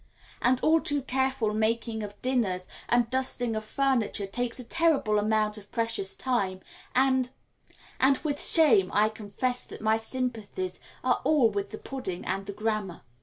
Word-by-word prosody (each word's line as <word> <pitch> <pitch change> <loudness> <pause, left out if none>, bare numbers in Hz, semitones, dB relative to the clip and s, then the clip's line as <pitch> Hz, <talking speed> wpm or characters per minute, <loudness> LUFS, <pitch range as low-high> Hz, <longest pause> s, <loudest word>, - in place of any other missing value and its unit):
And 255 0 +3
all 320 +1 +4
too 290 -2 0
careful 265 -4 0
making 220 +1 -1
of 205 -1 -8
dinners 215 -8 0 0.2
and 240 -1 +3
dusting 255 -3 0
of 215 - -3
furniture 240 -4 0
takes 235 +4 -3
a 250 - -6
terrible 275 -6 +2
amount 215 0 0
of 205 0 -18
precious 225 -4 -1
time, 195 -8 -1 0.3
and 260 -1 +3 0.7
and 270 +1 +4
with 290 -2 0
shame 230 - +6
I 210 +1 +4
confess 220 +4 -1
that - - -9
my 220 +1 +2
sympathies 250 - -4 0.2
are - - +1
all 275 -8 +3
with 200 -1 -3
the 215 - -7
pudding 250 -10 -6
and 195 +1 -3
the - - -3
grammar. 215 -3 -3
230 Hz, 160 wpm, -27 LUFS, 210-260 Hz, 0.7 s, shame